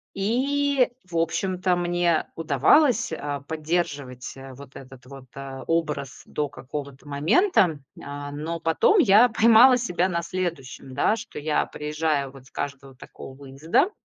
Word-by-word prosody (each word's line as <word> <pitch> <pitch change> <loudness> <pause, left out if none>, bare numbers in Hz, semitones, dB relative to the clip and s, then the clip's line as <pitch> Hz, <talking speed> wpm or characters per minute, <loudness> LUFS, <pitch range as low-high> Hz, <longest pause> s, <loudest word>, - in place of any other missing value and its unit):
И, 270 +6 +1 0.2
в 175 -2 -6
общем-то, 180 +2 0
мне 175 -1 +1
удавалось, 225 - +3
э, 145 -2 -4
поддерживать, 150 -5 -3
э, 135 0 -10
вот 140 +1 -13
этот 130 -1 -13
вот, 135 -1 -11
э, 135 -1 -7
образ 150 -5 -2
до 150 -1 -3
какого-то 140 0 -8
момента. 170 - +2 0.2
А, 145 0 -7
но 160 +3 -5
потом 165 - +3
я 220 - +6
поймала 230 +3 +6
себя 180 -6 0
на 170 -2 -2
следующем, 165 -8 -5
да, 210 - +1
что - - -10
я, 150 +1 0
приезжая 150 -2 -2
вот 135 -1 -15
с - - -18
каждого 135 -1 -6
такого 130 +1 -12
выезда, 140 - 0
160 Hz, 140 wpm, -24 LUFS, 140-185 Hz, 0.2 s, я